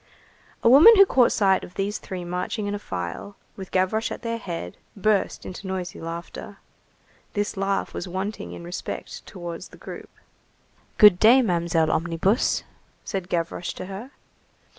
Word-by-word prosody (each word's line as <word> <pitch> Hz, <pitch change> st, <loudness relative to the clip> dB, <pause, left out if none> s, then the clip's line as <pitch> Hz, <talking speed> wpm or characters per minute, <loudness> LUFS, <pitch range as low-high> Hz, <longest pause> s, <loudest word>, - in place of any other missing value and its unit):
A -, -, +4 dB
woman 300 Hz, -, +9 dB
who 395 Hz, -1 st, +8 dB
caught 255 Hz, -9 st, +4 dB
sight 195 Hz, -3 st, +2 dB
of 175 Hz, -, -11 dB
these 200 Hz, +1 st, -2 dB
three 185 Hz, -2 st, -6 dB
marching 180 Hz, +4 st, -3 dB
in 205 Hz, -, -2 dB
a 205 Hz, -, -3 dB
file, 90 Hz, -, -6 dB, 0.2 s
with 190 Hz, -2 st, -8 dB
Gavroche 190 Hz, +4 st, 0 dB
at -, -, -7 dB
their 230 Hz, 0 st, -2 dB
head, 165 Hz, -, -6 dB, 0.2 s
burst 205 Hz, 0 st, 0 dB
into 185 Hz, +1 st, -7 dB
noisy 185 Hz, -2 st, -5 dB
laughter. 170 Hz, +5 st, -7 dB, 0.8 s
This 205 Hz, -1 st, -2 dB
laugh 195 Hz, 0 st, -1 dB
was 180 Hz, -, -5 dB
wanting 190 Hz, +4 st, -4 dB
in -, -, -9 dB
respect 175 Hz, +2 st, -6 dB
towards 175 Hz, -2 st, -7 dB
the -, -, -16 dB
group. -, -, -9 dB, 0.9 s
"Good 210 Hz, -5 st, +8 dB
day, 245 Hz, +4 st, +7 dB
Mamselle 170 Hz, -5 st, +1 dB
Omnibus," 170 Hz, +7 st, +1 dB, 0.4 s
said 190 Hz, -4 st, -4 dB
Gavroche 170 Hz, 0 st, -2 dB
to -, -, -7 dB
her. 195 Hz, +7 st, -8 dB
190 Hz, 155 wpm, -24 LUFS, 175-210 Hz, 0.9 s, woman